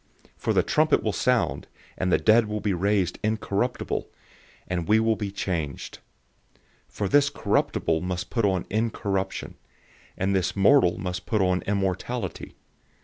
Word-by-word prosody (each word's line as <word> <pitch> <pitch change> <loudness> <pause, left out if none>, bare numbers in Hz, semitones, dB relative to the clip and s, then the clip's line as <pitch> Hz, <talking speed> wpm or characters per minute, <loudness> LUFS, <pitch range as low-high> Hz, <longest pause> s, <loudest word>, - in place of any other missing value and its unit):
For - - -2
the - - +3
trumpet 155 0 +2
will 110 - 0
sound, 125 +3 0 0.3
and 90 0 -1
the - - +5
dead 110 0 +4
will 105 0 -3
be 105 -1 0
raised 95 0 0
incorruptible, 110 +2 -1 0.6
and 90 -2 -2
we 110 +1 +5
will 110 0 +2
be 105 -1 -4
changed. 85 -7 -4 0.9
015:053 - - -30
For 100 - -1
this 145 +7 +4
corruptible 80 - 0
must 90 -1 -4
put 115 - 0
on 95 -3 +1
incorruption, 100 -3 -2 0.6
and 95 +1 0
this 95 -1 0
mortal 100 -2 +4
must 90 -2 -5
put 105 +1 +1
on 90 0 +1
immortality. 95 -2 -2
100 Hz, 145 wpm, -25 LUFS, 90-110 Hz, 0.9 s, the